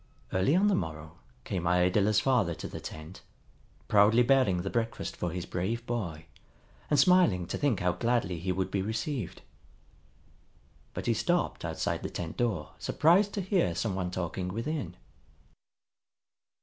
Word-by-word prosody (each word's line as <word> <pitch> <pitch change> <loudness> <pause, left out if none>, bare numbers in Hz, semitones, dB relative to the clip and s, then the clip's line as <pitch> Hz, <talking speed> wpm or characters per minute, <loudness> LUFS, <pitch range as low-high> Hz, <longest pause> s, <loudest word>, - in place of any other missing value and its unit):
Early 95 - +3
on 190 +3 +4
the 205 - +3
morrow 80 - -4 0.2
came 90 -6 -3
Iadilla's 90 +4 +3
father 115 -11 +2
to - - -6
the - - -7
tent, 80 +4 -9 0.7
proudly 105 +4 +5
bearing 120 -9 +3
the 95 - -3
breakfast 115 -1 -2
for 90 - -2
his 90 +1 -4
brave 115 +7 -3
boy, 90 -11 -4 0.6
and 150 - +3
smiling 180 - +4
to - - -4
think 140 -9 +1
how 90 0 +2
gladly 100 -2 0
he 90 +3 -2
would 95 0 -2
be 100 - 0
received. 110 - -3 1.5
But - - -4
he 115 - +3
stopped 175 +11 0
outside - - -2
the - - -4
tent 80 -2 -5
door 100 -11 -1
surprised 185 +6 +3
to 200 - -1
hear 180 - +1
some 110 +1 -1
one 90 -1 -2
talking 90 0 -3
within. 115 - -4
100 Hz, 150 wpm, -29 LUFS, 90-120 Hz, 1.5 s, proudly